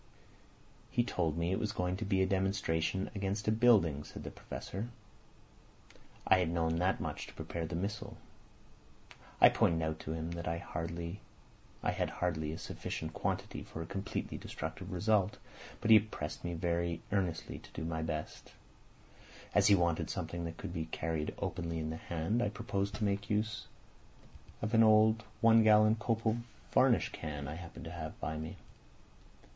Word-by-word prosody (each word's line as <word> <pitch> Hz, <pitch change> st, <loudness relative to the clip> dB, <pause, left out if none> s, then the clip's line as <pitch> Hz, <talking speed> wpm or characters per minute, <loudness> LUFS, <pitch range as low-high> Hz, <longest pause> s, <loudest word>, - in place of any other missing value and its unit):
"He 120 Hz, -, +2 dB
told 85 Hz, -9 st, 0 dB
me 85 Hz, +1 st, 0 dB
it 95 Hz, -, +1 dB
was 105 Hz, -, -1 dB
going 90 Hz, 0 st, 0 dB
to 110 Hz, -, -3 dB
be 95 Hz, -1 st, +3 dB
a -, -, +4 dB
demonstration 95 Hz, -1 st, 0 dB
against 100 Hz, +1 st, -2 dB
a -, -, +5 dB
building," 110 Hz, -11 st, +4 dB
said -, -, -9 dB
the -, -, -6 dB
Professor. 100 Hz, +5 st, -6 dB, 1.4 s
"I 95 Hz, -, +6 dB
had 90 Hz, -, +2 dB
to 85 Hz, -, -2 dB
know 80 Hz, -1 st, +2 dB
that 90 Hz, +4 st, +1 dB
much -, -, -4 dB
to -, -, -13 dB
prepare 85 Hz, -1 st, -4 dB
the 80 Hz, -, -4 dB
missile. 100 Hz, +5 st, -3 dB, 1.2 s
I -, -, +10 dB
pointed 80 Hz, -1 st, +2 dB
out 80 Hz, 0 st, -2 dB
to 80 Hz, -, -4 dB
him 80 Hz, +1 st, -3 dB
that 85 Hz, 0 st, -4 dB
I 85 Hz, +1 st, 0 dB
had 85 Hz, +3 st, -5 dB
hardly 80 Hz, -4 st, -1 dB
a 80 Hz, -, -5 dB
sufficient -, -, -5 dB
quantity -, -, -2 dB
for 80 Hz, -, -6 dB
a -, -, -8 dB
completely 95 Hz, +4 st, -4 dB
destructive -, -, -6 dB
result, 100 Hz, +2 st, +2 dB, 0.4 s
but 110 Hz, -, +2 dB
he 110 Hz, -, +11 dB
pressed 100 Hz, -8 st, -5 dB
me 85 Hz, -1 st, -2 dB
very 85 Hz, 0 st, -1 dB
earnestly 90 Hz, -5 st, -1 dB
to -, -, -15 dB
do 80 Hz, -, -4 dB
my 80 Hz, -1 st, -2 dB
best. 80 Hz, -1 st, -4 dB, 1.0 s
As -, -, +5 dB
he 100 Hz, -, +8 dB
wanted 85 Hz, -3 st, +1 dB
something 85 Hz, 0 st, -3 dB
that 85 Hz, 0 st, -5 dB
could 85 Hz, -, -6 dB
be 80 Hz, -2 st, -3 dB
carried 80 Hz, -1 st, -2 dB
openly 85 Hz, -2 st, -2 dB
in 80 Hz, 0 st, -2 dB
the 80 Hz, -, -4 dB
hand, 85 Hz, +9 st, -1 dB
I 105 Hz, -, +2 dB
proposed 100 Hz, -2 st, -2 dB
to 105 Hz, -, -3 dB
make 100 Hz, 0 st, 0 dB
use 105 Hz, +1 st, -1 dB, 1.0 s
of 105 Hz, -, -1 dB
an 115 Hz, -, +7 dB
old 110 Hz, 0 st, +6 dB, 0.2 s
one 115 Hz, 0 st, +7 dB
gallon 110 Hz, 0 st, +6 dB
copal 115 Hz, 0 st, 0 dB, 0.3 s
varnish -, -, +4 dB
can 75 Hz, -3 st, -5 dB
I 75 Hz, -, -4 dB
happened 85 Hz, +1 st, -8 dB
to 80 Hz, -, -6 dB
have 80 Hz, -3 st, -6 dB
by 80 Hz, +3 st, -2 dB
me. 80 Hz, +4 st, -5 dB
90 Hz, 170 wpm, -34 LUFS, 80-105 Hz, 1.4 s, he